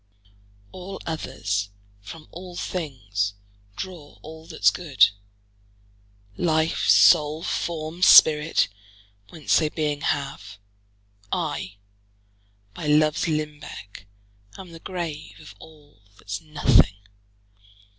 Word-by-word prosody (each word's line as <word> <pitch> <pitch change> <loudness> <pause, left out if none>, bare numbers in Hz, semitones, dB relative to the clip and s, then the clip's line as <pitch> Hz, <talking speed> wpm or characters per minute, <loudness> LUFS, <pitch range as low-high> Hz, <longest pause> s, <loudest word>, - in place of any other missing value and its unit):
All 185 +1 -8
others, 105 -10 -3 0.3
from 155 +10 -11
all 180 +1 -10
things, 105 - -3 0.4
draw 170 - -8
all 160 0 -11
that's - - +3
good, 155 -11 +3 1.3
Life, 160 -2 0
soule, 155 -1 +5
forme, 165 0 -4
spirit, 155 -3 +6 0.6
whence 155 -4 +1
they 155 -2 0
beeing 150 -2 -2
have; 135 -9 -3 0.7
I, 95 - -3 1.0
by 160 - -6
loves 155 +2 +2
limbecke, 150 -10 -6 0.5
am 185 -2 -11
the 165 - -11
grave 170 -5 -6
Of 155 - -13
all, 150 -7 -18 0.2
that's 100 0 -6
nothing. 145 -10 +3
155 Hz, 95 wpm, -24 LUFS, 140-165 Hz, 1.3 s, spirit